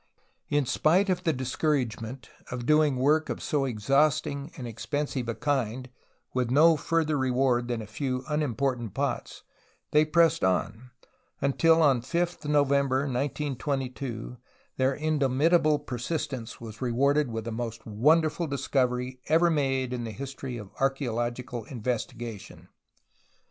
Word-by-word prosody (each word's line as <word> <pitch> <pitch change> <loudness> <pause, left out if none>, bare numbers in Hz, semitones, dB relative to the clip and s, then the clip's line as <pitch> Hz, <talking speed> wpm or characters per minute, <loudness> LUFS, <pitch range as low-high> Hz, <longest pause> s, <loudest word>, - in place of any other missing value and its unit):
In 145 -2 +2
spite 180 +10 +3
of 180 - -2
the 165 - +4
discouragement 130 -3 -2 0.2
of 125 -1 -5
doing 150 -1 +4
work 150 +5 +2
of - - -3
so 145 -2 0
exhaustive 140 +5 +1
and 130 - -6
expensive 130 +2 -3
a 115 - -2
kind 130 -1 -1 0.4
with 125 -2 0
no 160 +5 +6
further 155 0 0
reward 125 -2 +1
than 120 -2 -2
a - - -8
few 130 +4 -3
unimportant 135 -6 -1
pots, - - -3 0.5
they 150 0 +5
pressed 165 +1 +3
on, 110 +6 0 0.5
until 160 +4 +4
on 140 -4 +5
oth 170 +8 -2
November 140 -2 +3
1922 135 -3 -3 0.4
their 130 +1 +2
indomitable 150 +1 +2
persistence 135 -2 -4
was 110 -2 -10
rewarded 140 +3 +2
with 115 -1 -4
the 115 - -3
most 115 -1 -5
wonderful 155 +9 +2
discovery 130 -2 -1
ever 165 +2 +4
made 135 -4 0
in 120 -1 -3
the 115 - -4
history 135 +2 -6
of 105 -4 -9
archaeological 120 -3 -1
investigation. 120 -2 -5
135 Hz, 130 wpm, -27 LUFS, 120-150 Hz, 0.5 s, no